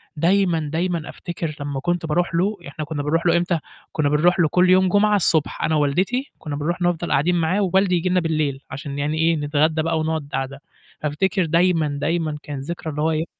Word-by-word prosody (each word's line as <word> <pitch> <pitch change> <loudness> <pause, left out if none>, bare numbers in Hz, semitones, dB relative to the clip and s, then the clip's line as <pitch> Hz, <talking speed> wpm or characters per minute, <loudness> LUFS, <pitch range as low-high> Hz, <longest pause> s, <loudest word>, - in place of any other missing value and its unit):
دايمًا، 170 -2 +2
دايما 170 -1 -1
أفتكر 165 -3 -5
لمّا 140 -1 -3
كنت 175 +2 -1
باروح 165 +2 0
له، 200 +5 +1
يع 170 - -11
إحنا 155 +2 -6
كنّا 145 -1 -4
بنروح 165 +4 0
له 170 0 +4
إمتى، 175 -1 0 0.3
كنّا 145 -2 0
بنروح 175 +5 +3
له 165 - +5
كل 180 +2 +3
يوم 185 0 +5
جمعة 210 +2 +3
الصبح 160 -5 +1
أنا 160 - +1
ووالدتي 185 - 0
كنّا 150 -2 -5
بنروح 170 +5 -2
نفضل 175 -1 0
قاعدين 150 +6 +2
معاه 175 +4 +1
ووالدي 190 -1 +2
ييجي 180 +2 0
لنا 180 - +3
بالليل 155 -5 -1
عشان 140 +1 -6
يعني 150 +2 -1
إيه، 165 +1 +3
نتغدّى 155 +1 +1
بقى 165 0 0
ونقعُد 155 -2 -2
قاعدة، 135 +1 -4 0.4
فأفتكر 175 +5 0
دايمًا، 165 -1 +2
دايمًا 160 -2 -1
كان 145 -2 -6
ذكرى 160 +1 -5
إن 150 - -5
هو 160 +2 +2
إيه 160 +1 -1
165 Hz, 205 wpm, -22 LUFS, 150-175 Hz, 0.4 s, له